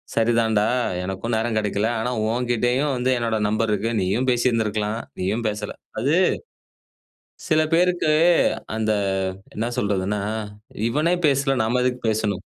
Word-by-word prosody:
"சரிதான்டா, 110 -2 +2 0.4
எனக்கும் 95 +5 -3
நேரம் 110 0 0
கெடைக்கல. 105 +1 0
ஆனா, 125 +3 -1 0.2
உங்கிட்டயும் 125 +3 0
வந்து 125 +1 0
என்னுடைய 115 -2 -1
நம்பர் 110 0 0
இருக்கு. 110 +3 -1
நீயும் 105 +8 0
பேசி 120 +1 +2
இருந்திருக்கலாம். 110 -1 -1 0.2
நீயும் 110 +5 -1
பேசல." 105 0 -5 0.3
அது 140 +6 +2 1.3
சில 155 -1 +4
பேருக்கு 175 -2 +2 0.6
அந்த, 110 -1 +1 0.6
என்ன 110 +3 -1
சொல்றதுன்னா, 100 -2 0 0.7
"இவனே 155 +7 +2
பேசல 135 -1 +1
நாம 120 +3 +1
எதுக்கு 125 0 -1
பேசணும்." 105 -3 -1
115 Hz, 125 wpm, -23 LUFS, 105-125 Hz, 1.3 s, சில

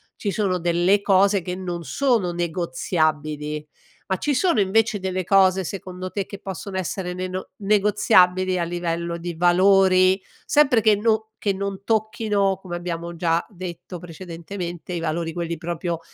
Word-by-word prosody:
ci 205 - -3
sono 190 -2 0
delle 175 +4 +2
cose 200 0 +3
che 180 +1 -4
non 175 -2 -5
sono 235 -9 +1
negoziabili 155 -3 -2 0.4
ma 190 - -1
ci 290 +7 0
sono 340 - +2
invece 205 +2 +2
delle 185 0 -2
cose, 190 0 +4
secondo 185 0 -6
te, 200 -2 -2
che 200 - -8
possono 195 0 -6
essere 180 +1 -3
neno 185 +1 -4
negoziabili 195 -3 +3
a - - +1
livello 170 0 -2
di 170 0 -5
valori, 185 +2 +4 0.2
sempre 270 -6 +4
che 215 -1 +5
no 220 +1 0
che 200 - 0
non 195 0 -4
tocchino 215 -3 +1
come 175 -2 -6
abbiamo 170 -1 -5
già 165 0 +1
detto 180 -1 -7
precedentemente 175 +1 -7
i 170 - -2
valori 165 0 -2
quelli 170 -1 -3
proprio 170 0 -3
185 Hz, 150 wpm, -23 LUFS, 170-200 Hz, 0.4 s, che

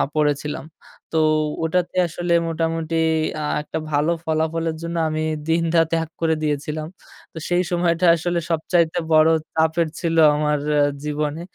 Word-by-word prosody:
পড়েছিলাম। 150 -1 -1 0.5
তো 160 - +1 0.4
ওটাতে 175 +2 -1
আসলে 175 +1 -2
মোটামুটি 165 0 -2 0.5
আ - - -3 0.2
একটা 150 - -5
ভালো 150 +3 +2
ফলাফলের 160 +1 -1
জন্য 170 0 -5
আমি 155 0 -2 0.2
দিন 165 +1 +2
রাত 165 -1 +4
এক 160 - -9
করে 160 -1 +2
দিয়েছিলাম। 150 +1 -2 0.5
তো - - -11
সেই 175 +1 +2
সময়টা 175 0 +1
আসলে 175 +1 -1
সবচাইতে 165 +1 +1
বড়ো 155 +1 +6 0.2
চাপের 160 +1 +2
ছিল 165 -2 -1 0.2
আমার 150 0 0 0.4
জীবনে। 150 +1 -2
160 Hz, 135 wpm, -21 LUFS, 155-170 Hz, 0.5 s, বড়ো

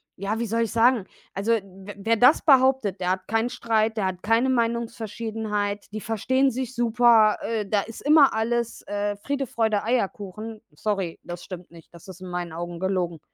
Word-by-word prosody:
ja, 200 +4 -3
wie 235 - -1
soll 230 +2 +1
ich 225 - -3
sagen? 235 -2 +3 0.3
Also, 205 +4 0
w 195 -2 -5
wer 225 +3 +1
das 250 +7 +5
behauptet, 260 - +4
der 180 0 0
hat 185 0 -3
keinen 225 +2 0
Streit, 225 -2 0
der 200 - 0
hat 185 -1 -5
keine 230 +4 +2
Meinungsverschiedenheit, 225 -3 -2
die 215 +1 -5
verstehen 260 +6 +1
sich 255 +1 -4
super, 235 -2 +4
äh, 220 -2 -2
da 205 0 +1
ist 225 +2 -9
immer 295 -1 +5
alles, 235 +1 -1
äh, 205 0 -2
Friede, 275 +5 -3
Freude, 220 -3 0
Eierkuchen. 215 -1 -3
Sorry, 195 +1 -3
das 175 0 -8
stimmt 180 -2 -9
nicht, 165 -1 -16
das 170 +1 -14
ist 185 -1 -11
in 185 - -8
meinen 175 -1 -4
Augen 175 +1 -6
gelogen. 180 -3 -1
220 Hz, 185 wpm, -24 LUFS, 195-235 Hz, 0.3 s, das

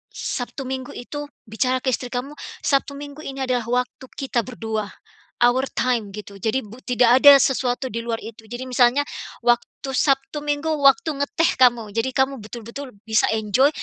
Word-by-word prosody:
Sabtu 250 +2 -4
Minggu 260 -1 -5
itu, 290 +4 -6 0.2
bicara 250 +3 -1
ke 260 - +1
istri 250 0 -2
kamu, 250 +3 -4 0.3
Sabtu 280 -1 +1
Minggu 285 +1 -9
ini 270 -3 -5
adalah 250 -3 -1
waktu 250 +1 -2
kita 250 -4 -1
berdua, 220 -4 -3 0.6
our 255 +2 +3
time 240 -5 0
gitu. 200 -1 -9
Jadi 225 +6 0
bu 220 +4 -12
tidak 245 0 +4
ada 285 -1 +11
sesuatu 260 -1 0
di 230 - -3
luar 230 -1 -3
itu. 220 0 -10
Jadi 240 +3 -6
misalnya, 250 +2 +3 0.4
waktu 240 0 +3 0.3
Sabtu 270 +2 +1
Minggu 290 +2 -1
waktu 310 +4 +4
ngeteh 320 +3 +1
kamu, 235 -4 +4
jadi 225 +3 0
kamu 265 -2 +1
betul-betul 235 +5 -8 0.2
bisa 220 0 +2
enjoy, 220 +5 +3
250 Hz, 165 wpm, -22 LUFS, 230-275 Hz, 0.6 s, ada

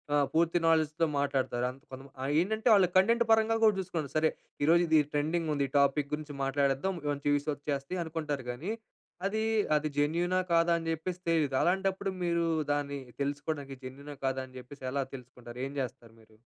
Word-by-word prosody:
ఆహ్, 145 - +4
పూర్తి 165 +1 +3
నాలెడ్జ్‌తో 160 0 +3
మాట్లాడతారు. 130 -3 0
అంత 135 +3 -17
కొంతమంది 135 +1 -11
ఆహ్, 140 +2 -1
ఏంటంటే 220 +5 -1
వాళ్ళు 190 -3 +5
కంటెంట్ 230 +5 +4
పరంగా 225 0 +4
కూడా 215 - +5
చూసుకుంటారు. 165 -6 -4
సరే. 155 0 +3 0.3
ఈరోజు 170 +2 +5
ఇది 160 -1 +5
ట్రెండింగుంది 150 -1 0
ఈ - - -32
టాపిక్ 140 +1 +2
గురించి 150 -2 -8
మాట్లాడేద్దాం. 140 +6 +1 0.2
మంచి 145 0 -4
వ్యూ‌స్ 145 +1 0
వచ్చేస్తాయి 145 +4 -3
అనుకుంటారు 150 -5 -3
కానీ 160 - -4 0.5
అదీ, 220 +2 0 0.3
అది 150 0 +1
జెన్యూనా 170 +5 +2
కాదా 165 +1 +4
అని 165 0 -4
చెప్పేసి 170 +3 -3
తెలీదు. 150 -5 +2
అలాంటప్పుడు 195 +2 +1
మీరు 170 -1 +1 0.3
దాన్ని 145 -1 -1 0.2
తెలుసుకోవడానికి 145 -1 -3
జెన్యూనా? 140 +3 -8
కాదా? 135 0 0
అని 130 0 -13
చెప్పేసి 130 +2 -12
ఎలా 140 +1 0
తెలుసుకుంటారు? 125 -1 -11
ఏం 140 - -9
చేస్తారు 120 -2 -7
మీరు? 110 -1 -22
150 Hz, 170 wpm, -30 LUFS, 140-170 Hz, 0.5 s, వాళ్ళు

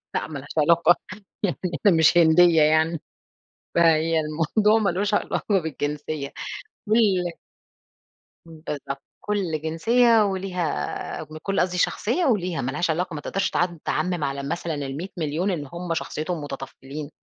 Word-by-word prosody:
لأ، - - -1
ما 150 -3 -6
لهاش 145 +3 -7
علاقة 170 +2 +5 0.5
يعني 195 - 0 0.3
أنا 200 - +7
مش 160 +2 +5
هندية 165 0 +6
يعني. 155 +1 +3 0.8
فهي 165 -1 +4
الموضوع 165 +8 +2
ما 205 - +2
لوش 200 +4 -1
علاقة 205 -1 +1
بالجنسية 150 -1 -4 0.5
كل 200 -6 +2 1.2
بالضبط، 150 -4 -6 0.2
كلّ 190 -7 -1
جنسية 225 +8 +3
وليها 185 - -3
من 155 - -8
كلّ 195 -1 0
قصْدي 180 0 0
شخصية 245 - +1
وليها 185 - +1
ما 130 - -2
لهاش 160 +4 -1
علاقة، 175 +1 -1
ما 150 - -4
تقدَرش 195 +5 -1
تع 175 - +2 0.2
تعمّم 165 -1 -1
على 140 0 -2
مثلًا 165 +2 -3
ال100.000.000 155 +4 -3
إن 150 -6 -3
هُم 175 -1 -3
شخصيتهم 160 +1 -3
متطفّلين، 140 +1 -7
165 Hz, 135 wpm, -24 LUFS, 155-185 Hz, 1.2 s, أنا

